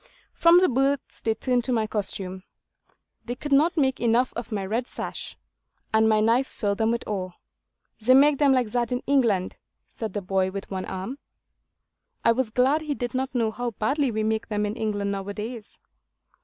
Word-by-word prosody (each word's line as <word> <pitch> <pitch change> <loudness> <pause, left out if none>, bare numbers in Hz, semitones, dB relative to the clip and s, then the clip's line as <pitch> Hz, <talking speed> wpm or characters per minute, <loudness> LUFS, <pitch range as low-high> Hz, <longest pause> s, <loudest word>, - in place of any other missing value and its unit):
From 340 +1 +6
the 370 - +5
boats 270 +2 0
they 225 -1 0
turned 245 +1 0
to 260 - -1
my 225 -3 +1
costume. 195 -3 -3 0.8
They 245 - -4
could 290 +3 -7
not 310 +5 +4
make 265 -3 +2
enough 235 +1 +2
of 235 0 -6
my 200 -3 -2
red 230 +6 -2
sash; - - -6 0.6
and 220 0 +4
my 215 -1 +4
knife 230 +5 +3
filled 200 -2 -2
them 220 0 +2
with 235 0 -2
awe. 185 -3 -3 0.7
'They 250 +4 +5
make 285 +1 +5
them 285 -2 +5
like 250 -5 +2
that 240 0 0
in 250 +1 -2
England,' 230 -10 +1 0.4
said 220 -4 -5
the 205 - -2
boy 190 0 +1
with 195 +1 -7
one 190 -1 -3
arm. 195 +9 -5 1.1
I 230 - +6
was 240 0 0
glad 260 +7 +2
he 300 -2 -3
did 245 -2 -4
not 260 +1 -2
know 225 -3 +1
how 245 +2 -3
badly 275 +5 +1
we 220 -1 -1
make 220 0 -1
them 210 -1 -1
in 210 +1 -3
England 205 -3 -2
now 195 -1 -4
a 200 - -5
days. 220 +1 -7
230 Hz, 195 wpm, -25 LUFS, 210-260 Hz, 1.1 s, From